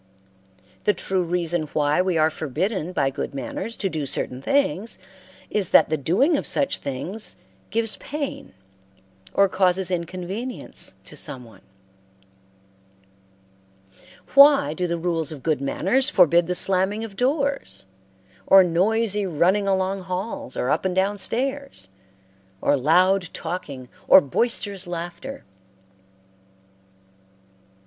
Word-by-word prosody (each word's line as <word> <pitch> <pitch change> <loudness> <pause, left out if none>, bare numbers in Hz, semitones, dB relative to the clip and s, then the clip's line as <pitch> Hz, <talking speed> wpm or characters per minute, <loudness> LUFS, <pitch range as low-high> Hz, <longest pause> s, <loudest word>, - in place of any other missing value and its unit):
The 210 - +3
true 190 +1 -1
reason 175 -2 -1
why 150 +2 +2
we 185 -2 0
are 155 0 +3
forbidden 165 - -2
by 135 -6 0
good 140 - -5
manners 140 - -5
to 195 - -1
do 155 -6 -3
certain 130 0 -1
things 225 - 0 0.5
is 200 -4 +1
that - - +5
the 155 - +1
doing 195 - +2
of - - -4
such 280 - 0
things 175 +11 -2 0.3
gives 225 -1 +1
pain 290 - -6 0.8
or 200 - +5
causes 185 -1 +1
inconvenience 185 +8 -5
to - - -12
some 130 -2 -4
one. 115 - -17 2.7
Why 280 - +7
do 180 +3 -2
the 170 0 -2
rules 165 -2 -1
of 145 -4 -9
good 155 -4 0
manners 245 - +1
forbid 170 - +4
the 180 - -1
slamming 195 +4 +1
of 215 -3 -8
doors, 275 - -1 0.6
or 195 -1 +8
noisy 205 +4 +1
running 185 +5 +2
along 190 0 0
halls 220 +10 -5
or 125 - 0
up 155 - +1
and 185 -1 -1
down 200 +2 +1
stairs, 265 - -2 0.7
or 145 - +2
loud 180 +6 +3
talking 150 -7 -6 0.2
or - - +9
boisterous 200 - -1
laughter? 175 +10 -6
185 Hz, 125 wpm, -23 LUFS, 160-215 Hz, 2.7 s, or